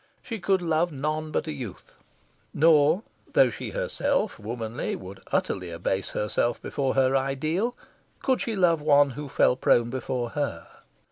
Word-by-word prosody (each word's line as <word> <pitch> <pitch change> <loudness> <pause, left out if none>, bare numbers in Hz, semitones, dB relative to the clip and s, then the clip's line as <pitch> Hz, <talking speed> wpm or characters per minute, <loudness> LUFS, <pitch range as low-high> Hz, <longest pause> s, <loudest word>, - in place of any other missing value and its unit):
She 225 -3 -5
could 190 0 +1
love 165 +1 +1
none 155 +2 -2
but 155 - -1
a 155 - -3
youth. 125 -10 -8 0.6
Nor 155 +4 +5 0.3
though - - +5
she - - -6
herself, 285 - -1
womanly, 115 +2 -4
would 95 +1 -9
utterly 90 -2 -1
abase 90 +3 -2
herself 110 +3 0
before 135 -2 -2
her 135 0 +3
ideal 155 - 0 0.5
could 260 -2 +2
she 225 - -2
love 170 -5 +3
one 145 -1 +5
who 145 +2 -7
fell 125 - +3
prone 120 -2 +3
before 125 -2 -3
her. 140 - -3
145 Hz, 150 wpm, -26 LUFS, 120-170 Hz, 0.6 s, Nor